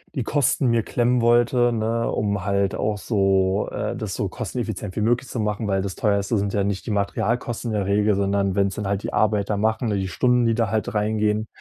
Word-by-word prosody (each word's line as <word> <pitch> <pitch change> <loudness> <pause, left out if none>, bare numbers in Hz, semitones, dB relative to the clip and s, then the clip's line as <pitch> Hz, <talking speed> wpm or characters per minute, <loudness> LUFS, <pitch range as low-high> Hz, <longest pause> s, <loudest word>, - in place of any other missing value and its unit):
die 130 - -1
Kosten 135 +1 +1
mir 115 0 +2
klemmen 120 +2 +1
wollte, 120 +1 +3
ne, 115 0 -1
um 100 -3 -1
halt 100 0 0
auch 105 0 -1
so 95 -2 +1
äh, - - -3
das - - -4
so - - -1
kosteneffizient 95 -3 -5
wie - - -1
möglich 120 +3 +1
zu 120 - -4
machen, 105 0 -1
weil 95 -1 +1
das 100 -1 -4
teuerste 100 +1 +1
sind 100 0 -1
ja 100 - +1
nicht 100 -1 -2
die - - -1
Materialkosten 115 +3 -1
in 105 - -1
der 100 - -1
Regel, 105 +1 +2
sondern 100 -1 0
wenn's 100 -1 +1
dann 105 -2 -3
halt 100 0 -1
die - - -4
Arbeiter 105 -1 +1
machen, 110 +3 0
ne, 105 - 0
die 95 -1 -2
Stunden, 125 +5 +2
die 115 -1 +2
da 115 -3 0
halt 110 -1 -1
reingehen. 105 0 0
105 Hz, 220 wpm, -23 LUFS, 100-115 Hz, -, wollte